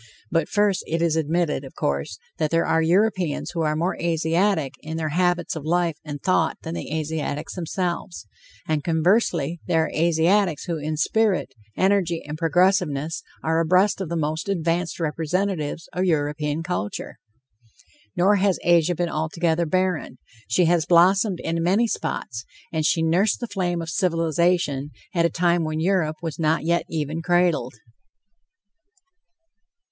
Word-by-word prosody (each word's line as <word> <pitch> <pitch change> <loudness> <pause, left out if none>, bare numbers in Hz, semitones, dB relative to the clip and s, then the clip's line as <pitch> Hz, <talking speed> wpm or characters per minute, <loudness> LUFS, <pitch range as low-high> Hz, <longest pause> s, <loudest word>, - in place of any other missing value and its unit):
But 165 - +1
first, 205 -2 +1
it 165 +1 -1
is 165 -1 +1
admitted, 160 -1 0
of 135 - -11
course, 70 +7 -2 0.2
that 155 -2 +1
there 165 +1 +2
are 165 - +2
Europeans 180 -1 +1
who 170 - -2
are 155 -1 +1
more 170 +4 0
Asiatic 165 -2 +1
in 160 +1 -6
their 160 -1 -2
habits 175 +2 0
of 160 - -5
life 170 0 0
and 145 -2 -6
thought 165 0 +1
than 165 - -5
the 170 - -6
Asiatics 155 -1 -3
themselves, 170 - -3 0.4
and, 155 -2 0
conversely, 170 -1 +1
there 160 -1 +3
are - - -6
Asiatics 170 +2 +2
who 170 -2 -3
in 155 +1 -3
spirit, 205 -4 +1 0.2
energy 185 -3 +1
and 150 +1 -5
progressiveness 165 -2 +1 0.2
are 160 +1 +1
abreast 185 +5 +3
of 185 - -4
the 170 - -2
most 155 +4 -2
advanced 170 -2 -1
representatives 165 +1 -2
of 180 - 0
European 150 -1 0
culture. 165 - -4 1.0
Nor 195 +4 +4
has 195 -1 +2
Asia 175 0 +3
been 175 +2 -1
altogether 165 +1 0
barren; 185 -6 -1 0.3
she 170 +10 +3
has 170 -1 +2
blossomed 185 +2 +4
in 165 0 -1
many 195 +7 +3
spots, 115 - -4 0.3
and 160 -1 +1
she 165 - +2
nursed 175 +6 +2
the 240 - -3
flame 180 -5 -2
of 165 - -6
civilization 165 -4 +1 0.2
at 170 -2 +3
a - - -5
time 170 +1 +1
when 155 0 -2
Europe 165 -3 +1
was 165 -1 -4
not 160 0 +1
yet 170 +1 +1
even 155 0 -3
cradled. 175 -7 +1
165 Hz, 150 wpm, -23 LUFS, 155-180 Hz, 1.0 s, Nor